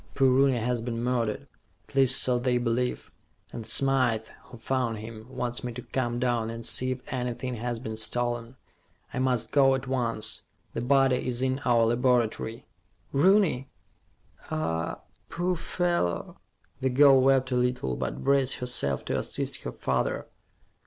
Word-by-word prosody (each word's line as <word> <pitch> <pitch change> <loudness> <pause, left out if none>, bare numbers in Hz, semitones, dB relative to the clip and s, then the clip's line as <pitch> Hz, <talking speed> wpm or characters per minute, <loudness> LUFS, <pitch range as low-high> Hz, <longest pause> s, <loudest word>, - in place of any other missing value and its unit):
Poor 135 -2 +4
Rooney 130 0 +4
has 120 +1 -1
been 115 0 -3
murdered 120 -4 -1 0.4
at - - -17
least 135 -1 +6
so 125 -1 +2
they 125 0 +1
believe 120 +1 -1 0.4
and 115 -2 -6
Smythe, 125 -3 +2 0.2
who 120 - -12
found 120 -1 -1
him, 110 +1 -9
wants 125 -2 -4
me 125 - -3
to 125 - -7
come 120 -2 -2
down 120 -2 0
and 115 0 -6
see 130 +2 +1
if 130 0 -5
anything 125 0 -3
has 120 +1 -3
been 110 -1 -6
stolen. 120 +2 -2 0.6
I - - -2
must 130 -3 0
go 135 -2 +5
at 130 0 -4
once. 120 -4 -1 0.3
The - - -3
body 135 0 +2
is 125 0 0
in 130 +1 0
our 120 -2 +4
laboratory." 120 -1 0 0.5
"Rooney? 160 -4 +3 0.8
Ah, 85 - -2 0.3
poor 180 +1 -1
fellow." 170 - -1 0.4
The 130 - 0
girl 135 0 +6
wept 135 0 +3
a - - +1
little, 125 - 0
but 65 +2 -4
braced 135 -1 +2
herself 70 - -1
to - - -1
assist - - -2
her - - -6
father. - - -1
125 Hz, 155 wpm, -27 LUFS, 115-130 Hz, 0.8 s, least